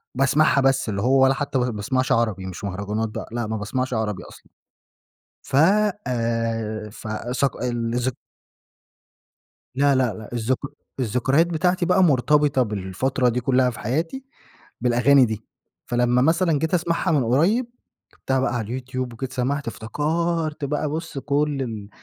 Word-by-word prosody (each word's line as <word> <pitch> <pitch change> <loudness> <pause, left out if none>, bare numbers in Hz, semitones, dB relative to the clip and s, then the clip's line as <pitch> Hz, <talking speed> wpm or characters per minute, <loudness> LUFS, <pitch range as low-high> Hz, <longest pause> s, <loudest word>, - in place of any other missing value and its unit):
باسمَعها 140 +2 +3
بس، 135 -2 +2
اللي 100 -1 -2
هو 130 +2 +4
ولا 135 - +5
حتى 140 -1 -2
ب-باسمَعش 125 +2 -1
عربي، 110 -5 +1
مش 95 0 -7
مهرجانات 100 +3 -2
بقى، - - -6
لأ 120 -1 -2
ما 110 0 -2
باسمَعش 130 +5 -2
عربي 110 -3 -2
أصلًا. - - -14 1.0
ف 130 - -3 0.5
آآ 115 -3 -2
ف 110 - -9 0.2
صق 135 -1 -1
الذك 120 +1 -1 1.6
لا، 140 0 +3
لأ، 125 -4 +1
لأ، 105 +2 -10
الذك 120 +2 0 0.4
الذكريات 130 +7 +2
بتاعتي 180 +2 +1
بقى 185 +2 +4
مرتبِطة 145 -1 +3
بالفترة 110 +5 -1
دي 120 - -1
كلّها 130 +1 +3
في 115 - -8
حياتي 165 - -2 0.6
بالأغاني 125 +2 +5
دي، 110 -2 -4 0.4
فلمّا 120 +1 +2
مثلًا 160 +1 +2
جيت 160 +3 -2
أسمَعها 170 +1 +1
من 145 -5 +3
قريّب 170 - +2 0.5
كتبتها 130 0 -1
بقى 130 -1 0
على 115 -3 -2
اليوتيوب 130 +1 -4
وجيت 130 +3 -6
سمَعت 135 +2 -1
افتكَرت 155 +6 -2
بقى 150 +1 -1
بُص 160 0 -5
كلّ 145 +1 0
ال 110 -5 -5
130 Hz, 145 wpm, -23 LUFS, 115-145 Hz, 1.6 s, ولا